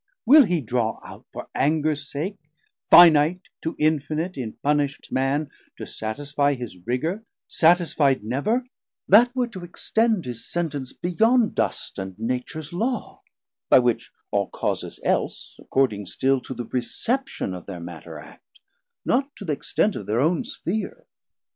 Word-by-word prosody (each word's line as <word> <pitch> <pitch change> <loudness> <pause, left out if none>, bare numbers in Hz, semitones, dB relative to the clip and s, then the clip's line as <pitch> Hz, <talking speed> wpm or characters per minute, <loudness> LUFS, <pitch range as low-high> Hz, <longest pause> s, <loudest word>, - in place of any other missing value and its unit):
Will 280 +3 +8
he, 175 -5 0
draw 120 -2 -1
out, - - -12
For - - -8
angers 150 -1 0
sake, 180 +8 -4 0.5
finite 165 +1 +7 0.2
to 160 - -3
infinite 155 +3 0
In 120 -5 -5
punisht 145 -1 -1
man, 140 +3 0 0.3
to - - -6
satisfie 145 +5 -1
his 120 -6 -7
rigour 160 - -1 0.2
Satisfi'd 160 - +3
never; 200 - 0 0.4
that 230 +5 +7
were 250 -1 +1
to 190 -6 -9
extend 220 +3 0
His 120 -2 -2
Sentence 145 -6 -2
beyond 220 +7 +2
dust - - -2
and 95 -1 -6
Natures 125 +7 -4
Law, 230 +6 -3 0.5
By - - +8
which 120 -2 +1 0.2
all - - +1
Causes - - -3
else - - -1
according 105 -7 0
still 135 +5 +1
To 130 - -7
the 120 - -5
reception 130 - -2
of 90 -2 -8
thir 95 -3 -7
matter 85 -1 -9
act, 75 0 -16 0.5
Not 270 +3 +1
to 200 - -9
th' 160 - -1
extent 200 +7 0
of - - -6
thir 110 +3 +1
own 160 - +2
Spheare. 270 - -4
150 Hz, 145 wpm, -24 LUFS, 125-185 Hz, 0.5 s, Will